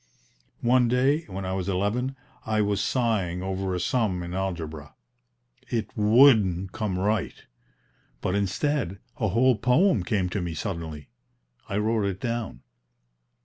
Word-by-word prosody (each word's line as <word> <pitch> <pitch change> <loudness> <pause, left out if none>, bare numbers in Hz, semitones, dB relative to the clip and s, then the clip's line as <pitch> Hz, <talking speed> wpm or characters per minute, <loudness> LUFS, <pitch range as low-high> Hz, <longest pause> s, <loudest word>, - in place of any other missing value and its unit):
One 125 0 +4
day, 135 +6 +2
when 95 -1 -5
I 95 - -2
was 95 0 -2
eleven, 105 +8 -1 0.3
I 110 -1 0
was 100 -1 0
sighing 100 -7 0
over 95 0 -2
a - - -2
sum 95 -3 0
in 85 0 -6
algebra: 80 -6 -4 0.7
it 110 -4 -3
WOULDN'T 105 -5 +5
come 100 -3 -2
right; 100 0 -1 0.7
but 90 - -2
instead 100 - 0 0.2
a 110 - 0
whole 120 +6 +3
poem 125 - +3
came 95 -1 0
to 95 +2 -2
me 85 -2 -4
suddenly. 80 -4 -5 0.6
I 100 - -1
wrote 110 0 +1
it 95 -1 -2
down. 115 - -4
100 Hz, 140 wpm, -26 LUFS, 90-115 Hz, 0.7 s, WOULDN'T